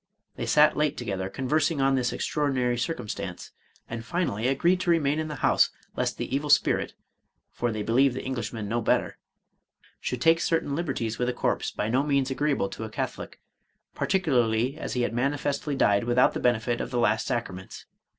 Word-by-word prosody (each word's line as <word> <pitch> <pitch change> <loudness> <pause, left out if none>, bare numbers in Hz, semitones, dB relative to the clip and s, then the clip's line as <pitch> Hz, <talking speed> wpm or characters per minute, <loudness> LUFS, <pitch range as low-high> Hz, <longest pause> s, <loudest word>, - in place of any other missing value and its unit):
They - - -4
sat 150 0 +5
late 150 -1 0
together, 95 -5 -3
conversing 145 +6 0
on 135 0 +3
this 125 -2 +1
extraordinary 130 -5 0
circumstance, 120 -3 -4 0.4
and 115 0 -5
finally 120 - -1
agreed 170 +7 +2
to 180 - -2
remain 155 -3 +2
in 155 - -2
the 150 - -5
house, - - +4 0.3
lest - - -1
the 130 - -3
evil 145 +2 -2
spirit - - +3 0.6
(for 120 -1 -1
they 110 -1 -3
believed 125 +4 +3
the - - -4
Eng 130 - -3
lishman 115 -3 -4
no 115 +3 -1
better) - - 0 0.8
should 125 - -3
take 165 +5 +4
certain 165 -4 0
liberties 135 -9 -2
with 125 - +1
the 125 - 0
corse - - 0
by 105 - -3
no 125 +4 +2
means 140 -2 +1
agreeable 140 -7 0
to - - -7
a 110 - -5
Catholic, - - -5 0.5
particularly 125 - +1
as 160 - -5
he 125 - 0
had 120 - -1
manifestly 140 +3 -1
died 100 -5 +3
without 120 +1 +3
the - - -3
benefit 120 0 +1
of - - -4
the 125 - -3
last 110 -2 +2
sacra 120 -6 -2
ments. 95 +1 -10
130 Hz, 190 wpm, -26 LUFS, 115-145 Hz, 0.8 s, sat